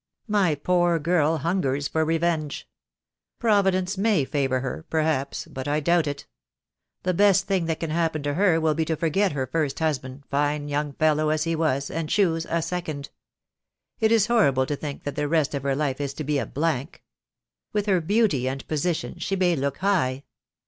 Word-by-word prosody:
My 200 Hz, -7 st, +2 dB
poor 175 Hz, +3 st, +2 dB
girl 165 Hz, 0 st, +2 dB
hungers 145 Hz, -4 st, 0 dB
for 160 Hz, -, 0 dB
revenge. 160 Hz, -2 st, -1 dB, 0.7 s
Providence 195 Hz, -4 st, +2 dB
may 200 Hz, -9 st, +2 dB
favour 135 Hz, -2 st, 0 dB
her, 135 Hz, +4 st, -4 dB
perhaps, 155 Hz, -4 st, -1 dB
but 130 Hz, 0 st, -7 dB
I 150 Hz, +1 st, +1 dB
doubt 170 Hz, +1 st, +2 dB
it. 145 Hz, -1 st, -4 dB, 0.8 s
The 185 Hz, -, +1 dB
best 195 Hz, +1 st, +4 dB
thing 190 Hz, -4 st, 0 dB
that 160 Hz, -1 st, -1 dB
can 165 Hz, -2 st, -3 dB
happen 160 Hz, -2 st, 0 dB
to 145 Hz, 0 st, -1 dB
her 175 Hz, -1 st, +3 dB
will 160 Hz, -1 st, +2 dB
be 160 Hz, -, 0 dB
to 160 Hz, -, -1 dB
forget 170 Hz, +4 st, +1 dB
her 135 Hz, -2 st, -1 dB
first 145 Hz, +1 st, -1 dB
husband, 140 Hz, -4 st, -2 dB
fine 145 Hz, +1 st, 0 dB
young 145 Hz, 0 st, -2 dB
fellow 155 Hz, +1 st, +2 dB
as 155 Hz, 0 st, +1 dB
he 165 Hz, 0 st, -1 dB
was, 140 Hz, -4 st, 0 dB
and 165 Hz, -2 st, -3 dB
choose 165 Hz, -5 st, +1 dB
a 165 Hz, 0 st, 0 dB
second. 155 Hz, -6 st, -4 dB, 0.9 s
It 220 Hz, -1 st, +3 dB
is 225 Hz, -3 st, +5 dB
horrible 195 Hz, -, +3 dB
to 145 Hz, +1 st, -2 dB
think 145 Hz, 0 st, -6 dB
that 145 Hz, -1 st, -4 dB
the 150 Hz, 0 st, -1 dB
rest 155 Hz, -2 st, +1 dB
of 140 Hz, -, -2 dB
her 135 Hz, 0 st, 0 dB
life 145 Hz, -1 st, -1 dB
is 140 Hz, -1 st, -3 dB
to 155 Hz, -, -4 dB
be 145 Hz, 0 st, 0 dB
a -, -, -3 dB
blank. 155 Hz, +1 st, -2 dB, 0.7 s
With 210 Hz, -1 st, -1 dB
her 190 Hz, -4 st, +2 dB
beauty 165 Hz, -, +2 dB
and 135 Hz, +1 st, -6 dB
position 160 Hz, +2 st, -2 dB
she 195 Hz, -, -1 dB
may 180 Hz, -2 st, +2 dB
look 140 Hz, -1 st, -2 dB
high. 150 Hz, -10 st, 0 dB
155 Hz, 190 wpm, -25 LUFS, 145-180 Hz, 0.9 s, is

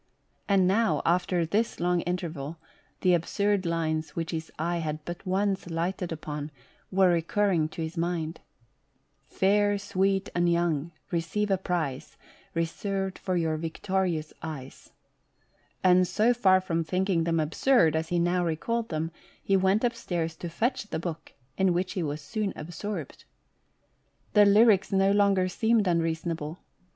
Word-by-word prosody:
And 195 Hz, -2 st, +4 dB
now, 220 Hz, +4 st, +2 dB
after 175 Hz, 0 st, +2 dB
this 210 Hz, +8 st, 0 dB
long 175 Hz, 0 st, +1 dB
interval, 165 Hz, -4 st, -4 dB, 0.4 s
the 180 Hz, -1 st, +4 dB
absurd 195 Hz, +3 st, +1 dB
lines 160 Hz, -1 st, -1 dB
which 165 Hz, -1 st, -3 dB
his 160 Hz, -1 st, -4 dB
eye 170 Hz, +2 st, -1 dB
had 155 Hz, -1 st, -4 dB
but 175 Hz, +2 st, -7 dB
once 195 Hz, -1 st, 0 dB
lighted 170 Hz, +2 st, -2 dB
upon, 150 Hz, -2 st, -5 dB, 0.4 s
were 190 Hz, -1 st, +4 dB
recurring 170 Hz, -1 st, +1 dB
to 165 Hz, -, -5 dB
his 160 Hz, +2 st, -6 dB
mind: 165 Hz, -1 st, -2 dB, 0.5 s
" -, -, -44 dB
Fair, 205 Hz, +1 st, +2 dB
sweet, 195 Hz, 0 st, 0 dB
and 175 Hz, 0 st, +2 dB
young, 170 Hz, -2 st, 0 dB, 0.2 s
receive 180 Hz, +5 st, -1 dB
a 195 Hz, -, +3 dB
prize 145 Hz, -7 st, -3 dB, 0.4 s
Eeserved 190 Hz, +3 st, -2 dB
for 185 Hz, -2 st, -1 dB
your 160 Hz, -2 st, 0 dB
victorious 165 Hz, 0 st, -2 dB
eyes"; 145 Hz, -5 st, -8 dB, 0.9 s
and 185 Hz, 0 st, +5 dB
so 225 Hz, +7 st, +3 dB
far 190 Hz, -6 st, +4 dB
from 170 Hz, -3 st, -1 dB
thinking 180 Hz, 0 st, 0 dB
them 165 Hz, -1 st, +1 dB
absurd, 160 Hz, -, +3 dB
as 160 Hz, 0 st, -1 dB
he 175 Hz, -, 0 dB
now 175 Hz, +1 st, +2 dB
recalled 225 Hz, +8 st, -1 dB
them, 160 Hz, 0 st, -2 dB, 0.3 s
he 195 Hz, -, +2 dB
went 190 Hz, +3 st, +3 dB
upstairs 175 Hz, -9 st, -1 dB
to 175 Hz, -, -5 dB
fetch 240 Hz, +8 st, -1 dB
the 160 Hz, -, -3 dB
book, 165 Hz, -1 st, -6 dB, 0.3 s
in 190 Hz, -2 st, +4 dB
which 180 Hz, +1 st, -1 dB
he 185 Hz, -, -2 dB
was 150 Hz, -1 st, -3 dB
soon 210 Hz, +5 st, -3 dB
absorbed. 175 Hz, +7 st, -6 dB, 1.1 s
The 210 Hz, -1 st, +7 dB
lyrics 205 Hz, 0 st, +5 dB
no 195 Hz, 0 st, +3 dB
longer 200 Hz, -2 st, +3 dB
seemed 220 Hz, +3 st, +2 dB
unreasonable. 165 Hz, -1 st, -1 dB
175 Hz, 145 wpm, -27 LUFS, 165-195 Hz, 1.1 s, The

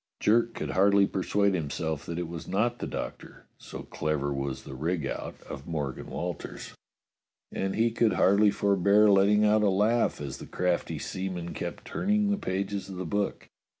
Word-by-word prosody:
Jerk 115 Hz, +2 st, +3 dB
could -, -, -3 dB
hardly 100 Hz, +1 st, +5 dB
persuade 100 Hz, +1 st, +1 dB
himself 80 Hz, -2 st, -3 dB
that 85 Hz, -, -4 dB
it 85 Hz, -1 st, -2 dB
was 85 Hz, -1 st, -7 dB
not 120 Hz, +5 st, 0 dB
the -, -, -3 dB
Doctor, -, -, -7 dB
so -, -, -8 dB
clever 75 Hz, -2 st, -2 dB
was 70 Hz, -1 st, -3 dB
the -, -, -9 dB
rig 80 Hz, +5 st, -2 dB
out -, -, -5 dB
of 70 Hz, -, -9 dB
Morgan 75 Hz, -5 st, -3 dB
Walters, -, -, -5 dB, 0.8 s
and 95 Hz, 0 st, -2 dB
he 115 Hz, +1 st, +2 dB
could 115 Hz, -1 st, +2 dB
hardly 100 Hz, +2 st, +5 dB
forbear 100 Hz, +1 st, +4 dB
letting 100 Hz, +2 st, +5 dB
out 105 Hz, 0 st, +4 dB
a 105 Hz, -, +4 dB
laugh 105 Hz, +5 st, +2 dB
as 70 Hz, -2 st, -6 dB
the -, -, -9 dB
crafty 90 Hz, -1 st, -1 dB
seaman 90 Hz, -2 st, -4 dB
kept 85 Hz, -, -6 dB
turning 205 Hz, +3 st, +1 dB
the 205 Hz, -, +1 dB
pages 100 Hz, -, -3 dB
of 95 Hz, -, -7 dB
the 90 Hz, 0 st, -4 dB
book. 100 Hz, +4 st, -2 dB
95 Hz, 175 wpm, -28 LUFS, 85-105 Hz, 0.8 s, hardly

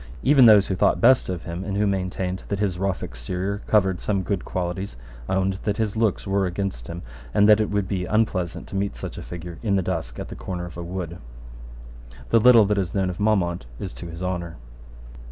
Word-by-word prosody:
Even 135 Hz, -3 st, +7 dB
those 105 Hz, -3 st, +7 dB
who 95 Hz, -, -2 dB
thought 90 Hz, -, +2 dB
best 130 Hz, +3 st, +5 dB
of 90 Hz, -3 st, -3 dB
him, 85 Hz, +2 st, -5 dB
and 100 Hz, 0 st, -3 dB
who 105 Hz, -, +2 dB
maintained 95 Hz, -1 st, -2 dB
that 100 Hz, -, -2 dB
his 95 Hz, -3 st, -1 dB
rough 95 Hz, -1 st, -1 dB
exterior 90 Hz, -, -4 dB
covered 95 Hz, -4 st, +2 dB
some 100 Hz, -3 st, 0 dB
good 95 Hz, 0 st, -2 dB
qualities, 90 Hz, -3 st, -4 dB, 0.3 s
owned 95 Hz, 0 st, 0 dB
that 105 Hz, -1 st, -1 dB
his 110 Hz, -2 st, -1 dB
looks 110 Hz, -2 st, +1 dB
were 95 Hz, -1 st, +1 dB
against 90 Hz, -10 st, -4 dB
him, 85 Hz, +1 st, -7 dB, 0.3 s
and 105 Hz, -, +5 dB
that 105 Hz, 0 st, +7 dB
it 110 Hz, -, 0 dB
would 100 Hz, -2 st, 0 dB
be 95 Hz, -2 st, -2 dB
unpleasant 100 Hz, -5 st, 0 dB
to -, -, -8 dB
meet 100 Hz, +1 st, -1 dB
such -, -, -6 dB
a -, -, -7 dB
figure 85 Hz, -1 st, -8 dB
in 105 Hz, -4 st, +1 dB
the 95 Hz, -, +1 dB
dusk 80 Hz, -9 st, -3 dB
at -, -, -6 dB
the -, -, -7 dB
corner 85 Hz, +8 st, -5 dB
of 90 Hz, -, -10 dB
a 85 Hz, -, -6 dB
wood, 85 Hz, -1 st, -5 dB, 1.1 s
The 115 Hz, -, +6 dB
little 115 Hz, -2 st, +7 dB
that 105 Hz, 0 st, +1 dB
is 95 Hz, -1 st, -3 dB
known 95 Hz, -2 st, +1 dB
of 90 Hz, -, -9 dB
Maumont 90 Hz, -, +1 dB
is 95 Hz, -, -5 dB
to 85 Hz, -, -8 dB
his 85 Hz, +2 st, -7 dB
honour. 85 Hz, -2 st, -3 dB
95 Hz, 220 wpm, -24 LUFS, 90-100 Hz, 1.1 s, Even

